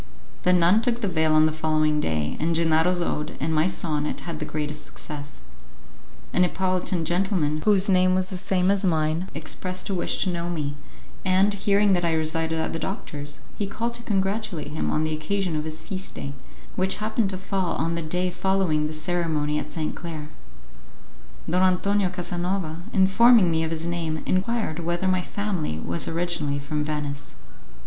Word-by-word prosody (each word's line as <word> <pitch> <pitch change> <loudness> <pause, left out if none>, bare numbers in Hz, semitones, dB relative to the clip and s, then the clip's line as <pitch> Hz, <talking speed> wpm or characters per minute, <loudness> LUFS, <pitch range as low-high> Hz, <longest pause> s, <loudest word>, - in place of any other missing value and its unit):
The 180 - +3
nun 180 +4 +5
took 240 0 0
the 205 - 0
veil 160 -3 +2
on 155 0 +6
the 155 - +2
following 155 -1 +1
day, 80 - -1
and 165 +1 +1
Gennaro's 165 +2 +3
ode 150 -2 -3
and 160 +3 -1
my 155 +2 +3
sonnet 150 -4 -1
had 165 -3 -5
the 155 - -3
greatest 150 0 -3
success. 145 - -8 0.9
A - - +1
Neapolitan 185 -1 +1
gentleman, 175 -4 +1
whose 200 -2 +5
name 185 -1 +4
was 185 +1 +1
the - - -2
same 185 +1 +2
as 200 0 +1
mine, 160 0 +1
expressed 185 +1 -4
a - - 0
wish 180 - +1
to 185 - 0
know 170 0 -3
me, 150 -4 -2 0.5
and, 190 +2 +3
hearing 200 0 +3
that 175 -1 +1
I 165 -1 +2
resided 160 +1 0
at 160 - -1
the 165 - -2
doctor's, 150 -6 -5 0.2
he 205 - 0
called 230 +4 -3
to 235 - -8
congratulate 195 -6 -1
him 155 - -2
on 155 - +1
the 155 0 0
occasion 175 +3 -1
of 155 0 -2
his 155 0 -3
feast 190 +2 -5
day, 140 - -5 0.4
which 190 +1 +1
happened 215 -1 0
to 190 - -4
fall 190 -1 -1
on 165 +1 0
the 170 - -1
day 180 +3 -1
following 180 -4 +1
the 155 - -6
ceremony 155 -2 0
at - - -6
Sainte 155 -2 -2
Claire. 155 -3 -6 1.2
Don 180 +2 +2
Antonio 190 +1 +3
Casanova, 175 -2 -2
informing 195 0 +6
me 160 0 +1
of 160 - -1
his 165 0 -2
name, 165 -2 -2
enquired 190 -3 0
whether 175 +2 -1
my 185 -1 +2
family 185 - -2
was 85 +1 -2
originally 165 -4 -1
from 150 +1 -2
Venice. 145 - -4
170 Hz, 180 wpm, -25 LUFS, 155-190 Hz, 1.2 s, on